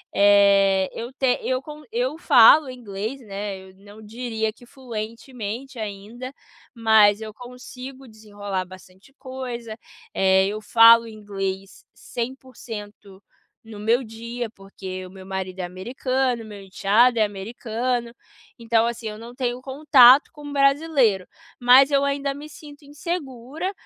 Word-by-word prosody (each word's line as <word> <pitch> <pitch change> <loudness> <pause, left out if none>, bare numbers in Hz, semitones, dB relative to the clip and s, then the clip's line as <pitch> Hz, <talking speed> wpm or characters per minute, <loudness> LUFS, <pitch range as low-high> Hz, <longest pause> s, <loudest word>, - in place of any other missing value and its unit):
Eh, 200 -1 +4
eu 235 +3 -6
ten 260 -2 +1
eu 255 0 -1
con 300 +1 -10
eu 250 +5 -1
falo 265 +2 +6
inglês, 225 0 -6
né, 200 -2 -6
eu 190 - -19
não 205 +2 -15
diria 220 0 -4
que 245 - -18
fluentemente 235 0 -7
ainda, 215 +5 -7 0.4
mas 220 -2 +4
eu 215 -1 -7
consigo 250 +2 -11
desenrolar 205 -4 -6
bastante 185 +6 -16
coisa. 250 -4 -7 0.4
Eh, 190 0 +3
eu 215 +1 -4
falo 230 +2 +6
inglês 195 -3 -6
100% 225 -5 -8 0.4
no 220 -2 -11
meu 230 +5 +1
dia 230 +1 -6
porque 190 -2 -9
o 185 - -12
meu 190 -1 -12
marido 190 -1 -5
é - - -2
americano, 245 +6 -2
meu 205 -2 -10
enteado 210 +5 +2
é 215 - +5
americano. 235 +4 -3 0.5
Então, 230 0 +1
assim, 235 -1 -5
eu 210 0 -7
não 235 +2 -11
tenho 250 -1 -3
contato 270 -1 +6
com 295 -2 -10
brasileiro, 275 - +2 0.3
mas 260 +3 +6
eu 280 0 +3
ainda 280 0 -1
me 295 +2 -10
sinto 290 -1 -14
insegura, 290 +1 -5
230 Hz, 135 wpm, -23 LUFS, 205-255 Hz, 0.5 s, falo